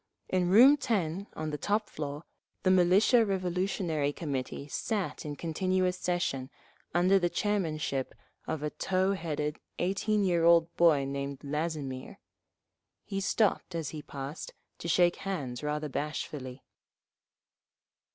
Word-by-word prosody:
In 180 -1 +1
room 255 +9 +8
10 195 - -1
on 155 0 -3
the 150 - -4
top 210 +1 0
floor, 145 0 -5 0.4
the 185 - +4
Military 185 +6 +5
Revolutionary 180 -6 -1
Committee 140 -2 -4
sat 205 +6 -2
in 145 -1 -4
continuous 185 +4 0
session, 175 -8 -1 0.4
under 185 +3 +4
the 175 -1 +1
chairmanship 155 -10 -1 0.3
of 160 -2 -3
a 150 - -1
tow 190 +1 +1
headed, 150 -4 -3 0.2
eighteen 200 +3 +1
year 175 -3 +2
old 170 0 +5
boy 155 -5 +4
named 140 0 -4
Lazimir. 145 -3 -3 0.9
He 195 -2 -3
stopped, 195 -3 +1
as 160 -4 -2
he 155 - -6
passed, 140 +2 -7 0.2
to - - -5
shake 175 +1 +3
hands 145 -11 -4
rather 150 +1 -2
bashfully. 140 -2 -4
170 Hz, 125 wpm, -30 LUFS, 150-185 Hz, 0.9 s, room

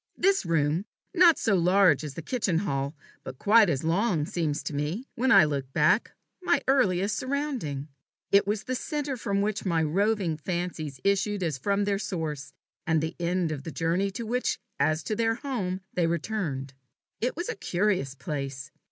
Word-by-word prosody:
This 385 - +2
room, 160 +3 +1 0.3
not 345 -2 +6
so 220 - +1
large 180 -4 +4
as 145 -3 -6
the 165 - -6
kitchen 205 -5 0
hall, 140 -5 -2 0.3
but 130 - -8
quite 215 - +5
as 140 -2 -1
long, 170 -1 +1
seems 155 -3 -2
to - - -4
me, 150 - -2
when 260 +3 +1
I 195 -8 +8
look 140 -3 -3
back, - - +3 0.3
my 350 -6 +2
earliest 205 -6 +2
surrounding. 260 - -3 0.4
It 200 0 +5
was 210 +1 -1
the 255 - -3
centre 290 +1 -2
from 200 -4 -1
which 210 0 -1
my 170 -4 +1
roving 190 0 +1
fancies 160 -4 -4
issued 200 0 +1
as 155 -6 -2
from 200 +7 +1
their 200 -1 0
source, 160 -8 -4 0.4
and 160 -1 +3
the 160 +1 -3
end 175 -1 0
of 145 -3 -5
their 160 - -6
journey 170 +4 0
to 230 +4 -6
which 245 +3 0 0.2
as 155 +1 +1
to 215 - -2
their 225 0 +1
home 215 -9 -3
they 175 -2 +1
returned. 165 -6 -2 0.5
It 245 +2 -1
was 345 +2 -4
a - - -3
curious 180 -8 0
place. 135 -2 -5
180 Hz, 180 wpm, -27 LUFS, 155-215 Hz, 0.5 s, I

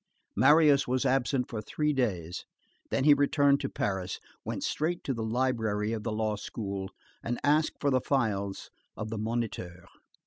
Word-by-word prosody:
Marius 150 -2 +5
was 130 +2 0
absent 130 -1 +1
for 110 -3 -5
three 150 +7 -1
days, 90 - -2 0.5
then 135 - 0
he 150 +1 +8
returned 145 0 +3
to - - -3
Paris, 95 -2 -2 0.2
went - - -4
straight 170 +3 -1
to 135 - -1
the 115 - -4
library 110 -2 0
of 110 - -3
the 115 - -3
law 110 0 0
school 100 -2 -5 0.3
and 120 +1 -3
asked 150 +2 +2
for 145 - +1
the 130 -1 +3
files 105 -8 -1 0.3
of 110 0 -5
the 110 - -3
Moniteur. 105 -6 -3
120 Hz, 165 wpm, -29 LUFS, 105-140 Hz, 0.5 s, he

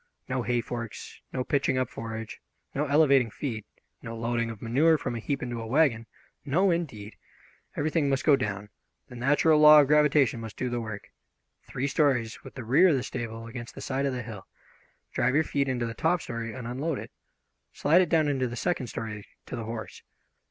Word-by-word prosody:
No 130 0 -1
hay 120 0 +1
forks, 115 -2 -7
no 130 - -2
pitching 135 -1 +1
up 130 -1 +1
forage, 115 -1 -7 0.3
no 145 +2 -1
elevating 140 -4 +4
feed, 110 -3 -5 0.4
no 115 0 -7
loading 115 0 -1
of 110 -2 -7
manure 145 +9 +3
from 125 -4 -4
a - - -3
heap 135 +4 -3
into 120 -2 -4
a 115 - -6
wagon. 120 -4 +2 0.4
No, 180 +7 +2
indeed! 115 -12 -4 0.6
Everything 150 -1 +1
must 135 -1 0
go 150 - +7
down; 105 -5 -4 0.4
the 125 - -10
natural 145 +5 +3
law 150 0 +9
of 145 - +6
gravitation 150 -4 +3
must 110 -2 -8
do 125 -1 -2
the 120 -1 -1
work. 110 -2 -7 0.6
Three 130 - -3
stories, 135 -6 +1
with - - -12
the 130 - -6
rear 140 +11 +5
of 165 - +4
the 130 - -1
stable 115 -3 -5
against 120 0 -8
the - - -8
side 135 +1 -1
of 135 - -1
the 125 -1 -4
hill. 110 -4 -9 0.7
Drive 130 - +1
your 160 - +4
feed 140 -2 -1
into 125 -2 -1
the 115 - -4
top 165 +6 +1
story 115 -4 -5
and 125 +1 -7
unload 135 +5 -2
it. - - -8 0.6
Slide 165 +5 +4
it 180 - 0
down 155 -2 +3
into 135 -3 0
the 120 - -6
second 130 -1 -1
story 105 -1 -6 0.2
to - - -6
the 115 -2 -5
horse. 115 0 -7
125 Hz, 200 wpm, -27 LUFS, 115-145 Hz, 0.7 s, law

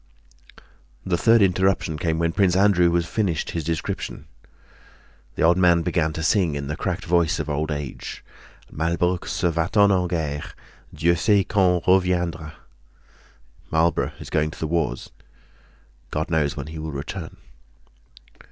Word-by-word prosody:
The 95 - +1
third 115 +4 +4
interruption 95 -4 +1
came 80 0 0
when 85 0 +1
Prince 90 0 +2
Andrew 95 -3 +4
was 85 0 +1
finishing 90 -4 -2
his 80 - -2
description. 80 -2 -4 1.1
The - - -1
old 85 +2 +5
man 85 -2 +4
began 80 -2 0
to 80 - -4
sing, 85 -3 +2
in 70 -1 -4
the 75 +2 -4
cracked 90 +2 -3
voice 85 -1 +2
of - - -4
old 75 +2 -2
age: 75 -3 -6 0.5
"Malbrook 85 +3 -1
s'en 85 - 0
va 85 +2 -1
t 105 - +1
en 95 -3 +4
guerre. 80 -4 -3 0.4
Dieu 85 +3 +2
sait 100 +3 +3
quand 90 -4 +2
reviendra." 90 -4 +1 1.2
"Marlborough 80 +1 +1
is - - -10
going 75 0 +1
to 80 - -11
the - - -2
wars; 80 -6 -2 1.0
God 80 +2 -3
knows 75 -2 0
when 70 - -4
he'll 80 0 -6
return." 80 +5 -6
85 Hz, 145 wpm, -23 LUFS, 80-90 Hz, 1.2 s, old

